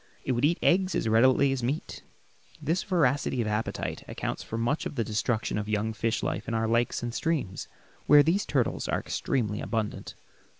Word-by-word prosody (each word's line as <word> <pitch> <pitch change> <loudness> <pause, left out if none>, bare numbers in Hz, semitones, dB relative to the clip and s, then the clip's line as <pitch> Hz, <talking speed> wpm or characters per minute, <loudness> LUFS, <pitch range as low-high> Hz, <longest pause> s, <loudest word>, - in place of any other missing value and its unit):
It - - -1
would 125 +2 +2
eat 170 +3 +2
eggs 185 +1 +3
as - - 0
readily 130 +5 +4
as 135 -2 -1
meat. 135 +6 -3 0.6
This 160 +4 0
voracity 145 -9 +1
of 115 - +1
appetite 105 +1 -2
accounts - - -4
for 115 - -5
much 120 +7 0
of - - -9
the 115 - 0
destruction 110 0 -1
of 105 0 -5
young 110 +1 0
fish 115 0 -1
life - - -2
in 115 - -1
our 110 0 +1
lakes 115 +1 +1
and 120 -1 -3
streams, 145 - -2 0.4
where 145 0 +8
these 180 +7 +2
turtles 130 -5 0
are - - 0
extremely 105 -6 -2
abundant. 105 0 -3
120 Hz, 185 wpm, -28 LUFS, 110-145 Hz, 0.6 s, where